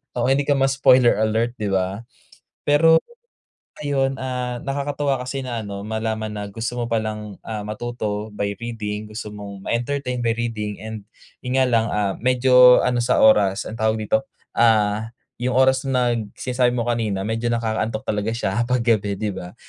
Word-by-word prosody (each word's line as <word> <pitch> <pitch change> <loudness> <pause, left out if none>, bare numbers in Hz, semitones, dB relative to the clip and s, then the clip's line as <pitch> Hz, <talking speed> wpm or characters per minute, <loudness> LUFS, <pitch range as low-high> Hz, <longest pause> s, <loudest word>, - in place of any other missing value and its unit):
oo, 120 0 0
hindi 140 +1 +2
ka 145 - +3
ma-spoiler 130 -4 +4
alert, 110 +2 0
'di 105 - -1
ba? 95 +3 -1 0.6
Pero, 160 +3 +6 0.9
ayun, 135 -1 0
ah, 125 -1 -3
nakakatuwa 140 -1 -1
kasi 130 +2 -4
na 120 -3 -3
ano, 100 -1 -6
malaman 110 -1 -3
na 105 -1 -4
gusto 115 +4 -4
mo 120 -1 -2
pa 115 - +1
lang, 105 -1 -5
ah, 110 -2 -4
matuto 105 -1 -4
by 100 0 -1
reading, 110 -3 -4
gusto 105 0 -7
mong 100 -1 -9
ma-entertain 125 +1 -2
by 115 - +2
reading, 110 -3 -4
and 110 -2 -7 0.3
'yon 125 0 -4
nga 130 -1 +4
lang, 115 -1 +3
ah, 100 -2 0
medyo 125 0 +6
ano 125 -1 +1
sa 120 - +2
oras, 105 -1 +4
ang 115 - -7
tawag 110 0 +1
dito, 110 +1 0 0.3
ah, 110 -1 +2 0.2
yung 125 +1 -1
oras 130 0 +4
nag 120 -5 0
sinasabi 125 -1 +1
mo 120 - 0
kanina, 110 -5 -1
medyo 115 +2 -2
nakakaantok 110 -1 -2
talaga 105 +1 -1
siya, 115 +1 -1
'pag 125 -1 +1
gabi, 105 -4 +1
'di 105 +1 -2
ba? 90 -1 -8
115 Hz, 170 wpm, -22 LUFS, 105-125 Hz, 0.9 s, Pero